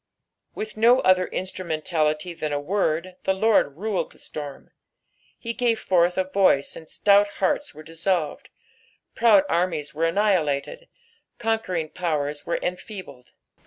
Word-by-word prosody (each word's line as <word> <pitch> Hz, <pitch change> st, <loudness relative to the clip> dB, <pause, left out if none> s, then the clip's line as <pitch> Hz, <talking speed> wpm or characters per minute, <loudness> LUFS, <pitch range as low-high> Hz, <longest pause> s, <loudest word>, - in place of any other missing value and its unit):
With 215 Hz, 0 st, -6 dB
no 235 Hz, +4 st, +5 dB
other 185 Hz, -1 st, +4 dB
instrumentality 160 Hz, -2 st, -2 dB
thaii 155 Hz, -2 st, -3 dB
a 145 Hz, -, 0 dB
word 180 Hz, +1 st, -1 dB
the 190 Hz, -, 0 dB
Lord 190 Hz, -8 st, +2 dB
ruled 205 Hz, 0 st, -2 dB
the -, -, -19 dB
storm. 145 Hz, -2 st, -8 dB, 0.7 s
He 230 Hz, 0 st, -5 dB
gave 230 Hz, -2 st, +1 dB
forth 175 Hz, -1 st, +2 dB
a 190 Hz, -, +3 dB
voice 185 Hz, -7 st, +2 dB
and 160 Hz, -, -11 dB
stout 205 Hz, 0 st, +4 dB
hearts 290 Hz, +10 st, 0 dB
were 155 Hz, -, -10 dB
dissolved, 165 Hz, +1 st, -2 dB, 0.6 s
proud 220 Hz, -4 st, +5 dB
armies 165 Hz, -5 st, -1 dB
were 160 Hz, +2 st, 0 dB
annihilated, 190 Hz, -, 0 dB, 0.5 s
conquering 220 Hz, -8 st, -1 dB
powers 150 Hz, -4 st, -3 dB
were 170 Hz, -, 0 dB
enfeebled. 180 Hz, -, -7 dB
180 Hz, 130 wpm, -24 LUFS, 155-205 Hz, 0.7 s, no